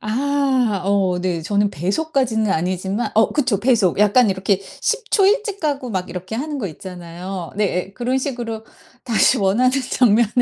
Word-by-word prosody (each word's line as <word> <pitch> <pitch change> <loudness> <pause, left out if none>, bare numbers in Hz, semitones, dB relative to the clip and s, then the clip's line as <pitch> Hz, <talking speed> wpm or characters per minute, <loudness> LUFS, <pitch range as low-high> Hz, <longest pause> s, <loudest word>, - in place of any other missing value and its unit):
아 255 -3 0
어 195 -2 +1
네. 180 -3 -2
저는 200 +3 +1
배속까지는 220 - 0
아니지만 185 +6 -2
어 220 +1 +4
그쵸. 255 -9 +1
배속. 220 -7 +2
약간 210 +2 +4
이렇게 190 +1 0 0.2
10 465 -1 -1
초 395 -3 +4
일찍 415 -1 +1
가고 280 -5 -2
막 185 -3 -3
이렇게 185 +4 -6
하는 295 +2 -4
거 215 - -3
있잖아요. 180 +2 -8
네예. 195 -2 -1
그런 255 +2 -1
식으로 240 -5 -4 0.4
다시 230 -3 +3
원하는 215 +6 +2 0.2
장면을 230 -2 +4
215 Hz, 315 characters per minute, -20 LUFS, 190-255 Hz, 0.4 s, 어